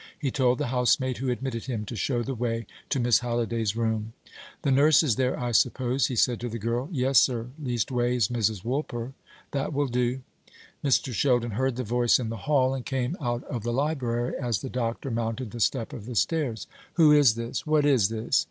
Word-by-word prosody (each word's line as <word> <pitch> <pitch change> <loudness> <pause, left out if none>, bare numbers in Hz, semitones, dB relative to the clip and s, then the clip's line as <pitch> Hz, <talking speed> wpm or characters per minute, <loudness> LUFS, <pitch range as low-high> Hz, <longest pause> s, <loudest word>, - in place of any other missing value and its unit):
He 140 -4 -2
told 130 -3 +2
the - - -1
housemaid 125 +1 +2
who 130 0 -2
admitted 125 -2 -3
him 115 -5 -3
to 115 - -6
show 120 +2 -1
the 135 - -3
way 115 -1 -2 0.2
to 140 - 0
Miss 120 -2 +4
Halliday's 115 -3 -1
room. 110 -1 -1 0.5
"The 140 - +2
nurse 145 +4 +5
is 130 -8 +2
there, 130 0 0
I 120 -1 -2
suppose?" 125 +2 +2
he 125 - -4
said 120 +1 +2
to 120 - -4
the 115 - -4
girl. 120 +5 -2
"Yes, 135 -4 +4
sir; 120 -2 +1
leastways, 120 -2 0
Mrs. 110 -5 -1
Woolper." 125 -1 -3 0.4
"That 140 +2 -2
will 145 +1 +1
do." 125 0 -1 0.6
Mr. 135 -2 +1
Sheldon 120 0 +1
heard 130 +4 0
the 125 - -3
voice 120 +1 +3
in 120 -3 -3
the 115 - -4
hall, 130 -3 +3
and 130 -2 -4
came 130 +4 -2
out 120 -2 -2
of 120 - -5
the 120 +3 -2
library 125 -3 -1
as 120 -7 -1
the 135 - -5
doctor 125 +1 -3
mounted 115 0 -3
the 120 - -7
step 115 +1 0
of 110 -2 -8
the 125 - -6
stairs. 125 - 0 0.3
"Who 160 -4 +6
is 145 -6 +6
this? 115 +4 -4
What 150 -1 +3
is 125 -9 +4
this?" 115 +4 +1
125 Hz, 205 wpm, -26 LUFS, 115-135 Hz, 0.6 s, Who